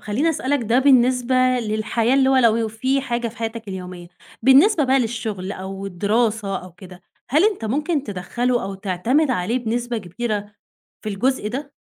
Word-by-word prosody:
خلّيني 260 +11 0
أسألك 280 -3 -1
ده 230 +3 +2
بالنسبة 255 -2 +3 0.3
للحياة 220 +2 0
اللي 270 -1 +4
هو 265 - +4
لو 230 -2 +3
في 260 +5 -1
حاجة 240 -3 -2
في 225 - -14
حياتك 225 -1 -5
اليومية، 180 -2 -7 0.3
بالنسبة 290 - +5
بقى 265 +1 +3
للشُغل 220 -5 -3
أو 195 +1 -6
الدراسة 205 +1 0
أو 180 -1 -12
كده، 180 0 -14 0.3
هل 305 +8 +4
أنت 410 - 0
ممكن 295 +6 -1
تِدخَّله 240 +5 -2
أو 195 +1 -5
تعتمد 205 - 0
عليه 230 +2 0
بنسبة 240 0 -2
كبيرة 210 +1 -4 0.5
في - - -4
الجزء 210 +3 -1
ده؟ 275 +5 -6
230 Hz, 160 wpm, -21 LUFS, 200-260 Hz, 0.5 s, بالنسبة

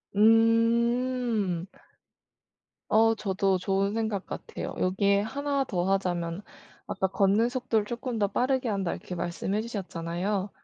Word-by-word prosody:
음. 230 -2 +3 1.2
어, 225 +1 +4
저도 195 -2 0
좋은 195 +2 0
생각 220 -4 -2
같아요. - - -6
여기에 200 +2 +2
1 280 +4 -1
더하자면 180 -2 -1 0.4
"아까 190 0 -1
걷는 195 +4 +2
속도를 245 -4 -1
조금 240 +1 -4
더 205 -1 +2
빠르게 255 +4 0
한다." 195 -4 -1
이렇게 180 - -6
말씀해 180 +4 -2
주셨잖아요. 190 -2 -3
205 Hz, 250 characters per minute, -27 LUFS, 190-230 Hz, 1.2 s, 어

